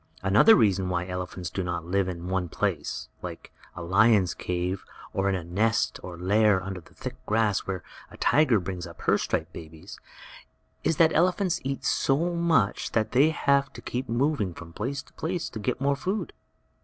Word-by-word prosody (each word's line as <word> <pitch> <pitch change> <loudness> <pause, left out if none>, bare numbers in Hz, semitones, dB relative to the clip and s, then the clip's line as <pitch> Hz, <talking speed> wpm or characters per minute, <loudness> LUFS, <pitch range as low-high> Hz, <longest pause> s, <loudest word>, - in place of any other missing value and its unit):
Another 105 - +7
reason 95 -4 +2
why 90 -1 -1
elephants 90 -1 -5
do 95 - -2
not 85 -2 -3
live 95 +2 +1
in 90 -1 -5
one 90 -2 -1
place, - - -2
like - - -8 0.2
a 85 - -6
lion's 95 +1 +4
cave, 90 +1 -3 0.3
or 95 +1 +1
in 95 - +1
a 90 - -3
nest 110 +7 0
or 90 -2 -8
lair 100 +2 +3
under 95 -1 -5
the - - -21
thick - - -7
grass 105 -2 +1
where 95 -1 -3 0.3
a - - -13
tiger 135 -7 +4
brings 90 -1 -5
up - - -13
her - - +2
striped - - -2
babies, 80 -1 -10 0.8
is 165 - +1
that 160 -1 +5
elephants 180 +1 +2
eat 135 0 -3
so 165 +6 +1
much 170 -11 +1
that 110 -1 +1
they 135 +5 +5
have 140 -3 +2
to - - -9
keep 125 +2 -4
moving 120 - 0
from 85 -1 -11
place 130 +8 -3
to - - -23
place 170 +1 -3
to 110 - -6
get 125 +4 -2
more 140 +1 +2
food. 190 +9 -3
105 Hz, 185 wpm, -27 LUFS, 90-140 Hz, 0.8 s, Another